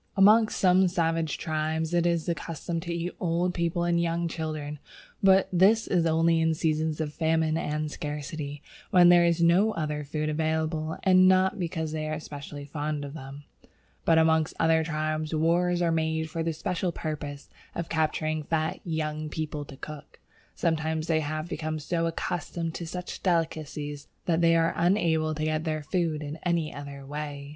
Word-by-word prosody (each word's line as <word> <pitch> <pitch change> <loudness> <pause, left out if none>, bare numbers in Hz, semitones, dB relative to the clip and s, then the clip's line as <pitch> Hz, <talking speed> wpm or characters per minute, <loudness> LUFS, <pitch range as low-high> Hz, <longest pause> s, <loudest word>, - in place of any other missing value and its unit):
Amongst 215 +3 +6
some 185 0 +5
savage 165 -3 0
tribes 160 +1 -2
it 175 0 +3
is 170 -2 +1
the 170 - +1
custom 165 +1 -4
to 170 +1 -5
eat 170 +1 -2
old 175 +1 0
people 170 0 0
and 170 0 +2
young 170 0 0
children; 155 -3 -4 0.4
but 190 -1 +5
this 200 +5 +5
is 170 -3 +2
only 165 +1 +3
in 160 0 +2
seasons 155 -1 0
of 150 -2 -2
famine 160 -1 +1
and 150 -1 -2
scarcity, 150 -1 -5 0.3
when 175 -1 +7
there 175 0 +7
is 170 0 +2
no 190 +6 +4
other 150 -2 -2
food 150 +1 -3
available, 160 0 -1
and 185 -1 +6
not 190 +2 +3
because 165 -3 -2
they 155 0 -3
are 155 0 -2
specially 145 -1 -8
fond 145 0 -3
of 140 - -8
them. 140 -1 -9 0.6
But 165 - +4
amongst 160 -1 +3
other 160 0 +3
tribes 155 0 -2
wars 175 +2 +2
are 170 - +2
made 160 -1 -1
for 165 - -2
the 165 0 -1
special 180 +2 -2
purpose 145 -3 -5 0.3
of 170 - -3
capturing 155 -1 0
fat 155 +1 -1
young 155 -2 -3
people 150 -1 -4
to 135 - -12
cook. 150 +1 -10 0.4
Sometimes 160 -1 0
they 160 -2 +2
have 155 +1 -3
become 155 -3 -3
so 165 +2 -1
accustomed 165 0 -3
to 170 - -5
such 180 +2 -6
delicacies 155 -4 -2 0.2
that 170 -1 +1
they 165 0 +5
are 165 0 +2
unable 165 -3 +2
to 155 - -3
get 155 0 0
their 155 -2 -2
food 160 -2 -1
in 150 +2 -5
any 170 -2 -1
other 140 -1 -8
way. 145 0 -6
160 Hz, 175 wpm, -27 LUFS, 155-170 Hz, 0.6 s, when